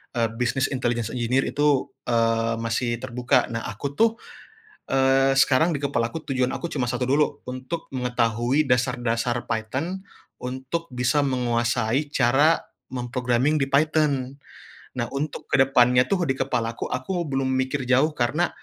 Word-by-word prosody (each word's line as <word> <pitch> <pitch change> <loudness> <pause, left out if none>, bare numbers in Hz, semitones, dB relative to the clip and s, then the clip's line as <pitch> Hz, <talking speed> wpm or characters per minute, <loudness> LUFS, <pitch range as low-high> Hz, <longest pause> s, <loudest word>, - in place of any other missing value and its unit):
eee, 115 -1 +1
business 130 +3 0
intelligence 120 -4 -1
engineer 125 +2 +1
itu, 145 -2 +1 0.2
eee, 115 -1 +1
masih 115 +1 -1
terbuka. 125 -1 +1
Nah, 115 0 -4
aku, 125 +7 -5
tuh, 225 0 +4 0.7
eee, 135 0 +3
sekarang 145 +4 +3
di - - -7
kepalaku 140 +2 -2
tujuan 130 -1 +1
aku 170 - -4
cuma 125 -4 -1
satu 125 0 -1
dulu, 145 +2 0
untuk 130 +6 -5
mengetahui 125 +2 +1
dasar-dasar 120 -2 0
Python, 130 - -3 0.4
untuk 130 +6 -4
bisa 125 +4 +1
menguasai 120 0 0
cara 140 +5 +3 0.3
mem-programming 125 +3 0
di 135 - 0
Python. 140 -2 +1 0.6
Nah, 120 - 0
untuk 145 +2 -4
ke - - +3
depannya, 125 -2 +4
tuh, 185 -3 +1
di 135 - +1
kepalaku 115 -2 -2
aku 175 +8 -2
belum 135 -1 -1
mikir 130 +1 -1
jauh 130 +5 +3
karena 135 +8 +1
130 Hz, 140 wpm, -24 LUFS, 120-140 Hz, 0.7 s, tuh